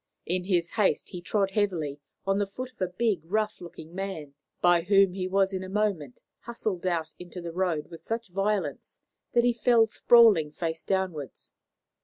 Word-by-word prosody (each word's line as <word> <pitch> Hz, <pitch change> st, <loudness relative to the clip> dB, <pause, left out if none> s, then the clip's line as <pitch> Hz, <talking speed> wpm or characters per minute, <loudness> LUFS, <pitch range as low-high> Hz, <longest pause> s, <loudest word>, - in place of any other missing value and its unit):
In 180 Hz, +1 st, -1 dB
his 175 Hz, -3 st, +1 dB
haste 210 Hz, -3 st, +1 dB
he 180 Hz, -, -7 dB
trod 195 Hz, +2 st, 0 dB
heavily 175 Hz, -9 st, -1 dB, 0.3 s
on 195 Hz, +1 st, +1 dB
the 205 Hz, -, 0 dB
foot 255 Hz, +6 st, -7 dB
of 240 Hz, -, -23 dB
a 185 Hz, -, +2 dB
big, 200 Hz, 0 st, 0 dB
rough 210 Hz, +5 st, -1 dB
looking 165 Hz, -1 st, -11 dB
man, 185 Hz, -7 st, -5 dB, 0.3 s
by 175 Hz, -1 st, +4 dB
whom 195 Hz, +1 st, +4 dB
he 185 Hz, -1 st, -3 dB
was 195 Hz, +1 st, +2 dB
in 190 Hz, 0 st, -3 dB
a 185 Hz, -, -7 dB
moment 190 Hz, -10 st, -1 dB, 0.2 s
hustled 215 Hz, -6 st, -4 dB
out 165 Hz, -3 st, -1 dB
into 180 Hz, +1 st, -8 dB
the 170 Hz, -1 st, -6 dB
road 175 Hz, -3 st, -1 dB
with 165 Hz, -1 st, -10 dB
such 225 Hz, +3 st, -4 dB
violence 195 Hz, +2 st, -2 dB, 0.3 s
that 240 Hz, -1 st, +4 dB
he 245 Hz, 0 st, +3 dB
fell 235 Hz, -1 st, +4 dB
sprawling 220 Hz, -8 st, +5 dB
face 160 Hz, +1 st, -4 dB
downwards. 180 Hz, -8 st, -3 dB
190 Hz, 180 wpm, -27 LUFS, 170-210 Hz, 0.3 s, sprawling